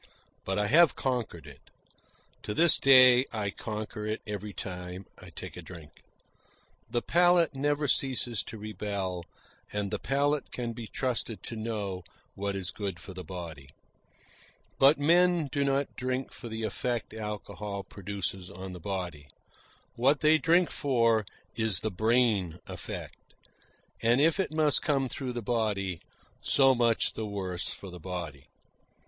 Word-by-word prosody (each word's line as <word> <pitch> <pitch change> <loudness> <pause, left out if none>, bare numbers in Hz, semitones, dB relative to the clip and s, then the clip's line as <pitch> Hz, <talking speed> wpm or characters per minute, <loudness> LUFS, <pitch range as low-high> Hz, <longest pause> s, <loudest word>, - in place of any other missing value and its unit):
But 95 - -1
I 105 - +2
have 165 +8 +5
conquered 120 -10 -2
it. 70 -3 -12 0.8
To 105 - -4
this 170 -1 +6
day 130 -2 +8
I 105 -3 -2
conquer 105 0 -5
it 110 +1 -3
every 105 -1 -5
time 90 -1 -6
I - - -12
take - - -9
a - - -7
drink. 85 -5 -12 0.9
The 120 - -1
palate 175 -2 +4
never 145 +2 0
ceases 125 -5 +1
to 110 - -7
rebel, 100 -4 -4 0.5
and 105 -1 -2
the - - -2
palate 145 +1 0
can 120 -2 -3
be 115 -1 -7
trusted 120 -3 -2
to 115 - -5
know 105 -5 -3 0.3
what 100 0 -3
is 95 -3 -3
good 100 -4 -4
for 95 - -9
the 90 0 -7
body. 85 -7 -8 1.1
But 140 +3 +7
men 170 +2 +4
do 140 - +1
not 140 0 0
drink 130 +1 -3
for 120 - -8
the 110 0 -4
effect 115 +2 -2
alcohol 105 -2 -5
produces 95 -2 -5
on 95 0 -8
the 90 - -8
body. 85 -5 -4 0.7
What 135 +5 +3
they 155 +1 +5
drink 170 +2 +3
for 115 -6 +2 0.3
is 110 -6 +1
the 110 - -1
brain 110 -4 +2
effect; - - -7 0.8
and 120 +3 +4
if 160 +5 +3
it 190 - 0
must 155 -2 +3
come 135 -3 +1
through 125 0 -4
the 120 -1 -4
body, 100 -6 -1 0.4
so 135 -1 +6
much 120 -2 +2
the 110 - -4
worse 95 -3 -3
for 95 - -7
the 90 - -9
body. 85 -6 -6
110 Hz, 150 wpm, -29 LUFS, 95-135 Hz, 1.1 s, day